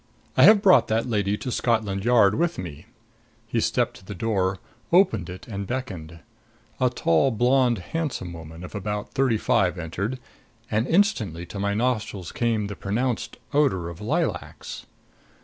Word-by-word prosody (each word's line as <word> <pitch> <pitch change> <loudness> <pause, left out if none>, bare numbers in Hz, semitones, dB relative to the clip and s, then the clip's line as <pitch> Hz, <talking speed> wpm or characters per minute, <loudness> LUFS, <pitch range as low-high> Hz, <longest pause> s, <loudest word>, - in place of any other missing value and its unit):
I - - +7
have 215 -2 +7
brought 185 -2 +6
that 110 +1 +1
lady 105 -4 0
to 125 - -5
Scotland 110 -5 0
Yard 115 -5 +5
with 170 +6 0
me." 85 0 -7 0.6
He 115 +1 -1
stepped 120 +1 0
to - - -17
the 100 - -7
door, 95 -2 0 0.3
opened 140 - +3
it 90 +1 -9
and 100 -3 -5
beckoned. 90 -11 -5 0.6
A 130 - +3
tall, 100 -1 +2
blonde 125 +1 +3
handsome 95 - -4
woman 80 +1 -10
of 90 - -9
about 105 0 -4
thirty 130 -4 +2
five 100 -6 +1
entered; 90 +9 -3 0.5
and 110 +4 +1
instantly 120 - +1
to 90 +4 -7
my 100 0 0
nostrils 110 -6 -1
came 115 -3 0
the 100 0 -5
pronounced 120 +4 -2 0.2
odor 130 - +2
of 85 +2 -10
lilacs. 155 +10 -3
105 Hz, 155 wpm, -25 LUFS, 95-125 Hz, 0.6 s, I